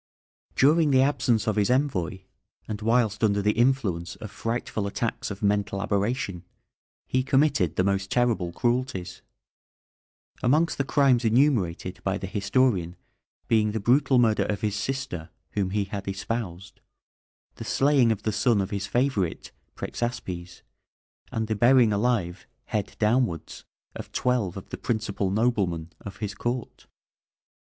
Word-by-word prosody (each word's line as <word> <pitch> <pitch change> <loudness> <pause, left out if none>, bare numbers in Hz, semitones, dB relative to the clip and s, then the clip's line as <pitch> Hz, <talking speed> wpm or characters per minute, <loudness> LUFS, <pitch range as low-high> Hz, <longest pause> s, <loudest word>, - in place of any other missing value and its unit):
During 155 +3 +4
the 130 -1 +5
absence 125 -6 +1
of 110 -2 0
his 100 -1 +2
envoy, 115 - 0 0.5
and 110 0 -5
whilst 115 -1 +1
under 100 -2 +3
the 105 +1 +2
influence 105 -8 0
of 105 - -9
frightful 115 -3 -3
attacks 115 +3 -3
of 100 0 -7
mental 100 -1 +1
aberration, 100 -2 -1 0.6
he 130 - +1
committed 135 - +2
the 95 - +2
most 100 0 0
terrible 115 -8 +1
cruelties, 120 -4 -2 1.2
amongst 155 +7 +2
the - - +3
crimes 135 -3 +3
enumerated 110 - +1
by 95 0 0
the 100 - -5
historian 100 -3 +1 0.5
being 105 -2 +2
the 110 - -1
brutal 130 +5 +3
murder 110 -4 +3
of 100 -1 -2
his 105 -1 -1
sister, 130 -10 -4 0.2
whom 100 -3 -1
he 105 +1 0
had 100 0 -6
espoused; 95 -2 -5 0.8
the - - -6
slaying 135 -4 +3
of 105 -2 -2
the 110 - 0
son 105 +1 +2
of 95 0 -2
his 100 -1 -3
favourite, 120 -9 -1 0.2
Prexaspes, 90 -8 -5 0.7
and 110 -1 -2
the 110 - -1
burying 120 0 +5
alive 100 -5 -1 0.2
head 105 -4 -3
downwards 110 - 0 0.3
of - - -8
twelve 120 -8 0
of 95 - -9
the - - -6
principal 105 -4 -1
noblemen 95 -7 0
of 100 -1 -9
his 105 -2 -4
court. 120 +3 -4
110 Hz, 140 wpm, -26 LUFS, 100-125 Hz, 1.2 s, the